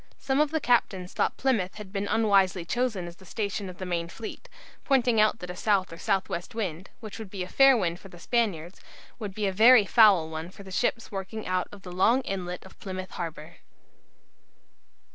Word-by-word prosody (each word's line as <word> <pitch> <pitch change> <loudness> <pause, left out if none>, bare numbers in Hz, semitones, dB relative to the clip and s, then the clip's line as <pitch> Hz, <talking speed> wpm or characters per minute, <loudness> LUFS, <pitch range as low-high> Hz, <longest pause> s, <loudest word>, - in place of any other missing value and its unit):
Some 270 +1 -1
of 300 - +2
the 315 +1 -1
captains 195 -8 +1
thought - - 0
Plymouth 225 -9 0
had 210 -2 -10
been 200 0 -2
unwisely 195 -5 +2
chosen 230 -3 -1
as 170 0 -11
the - - -17
station 200 0 -4
of 180 - -10
the 185 - -5
main 170 -2 -2
fleet, 225 - -9 0.3
pointing 245 -5 +3
out 215 +1 +3
that 180 -3 -7
a - - -8
south 190 -4 +1
or - - -9
south 195 -2 0
west 170 +5 -5
wind, 185 -5 -4
which 215 -1 -8
would 220 -3 -7
be 190 -1 -4
a - - -7
fair 270 +5 +6
wind 175 -4 -1
for 195 - -13
the 175 - -13
Spaniards, 185 -4 -1 0.4
would 205 -4 -6
be 210 - -1
a 195 - 0
very 220 +2 +7
foul 200 -7 +5
one 160 +1 -6
for 190 +1 -12
ships 230 +3 -1
working 200 +2 -5
out 185 0 -1
of 200 -2 -13
the 180 - -8
long 220 +8 +3
inlet 185 -6 -5
of 190 - -16
Plymouth 185 -1 -6
Harbour. 160 -3 -7
195 Hz, 205 wpm, -27 LUFS, 180-225 Hz, 0.4 s, very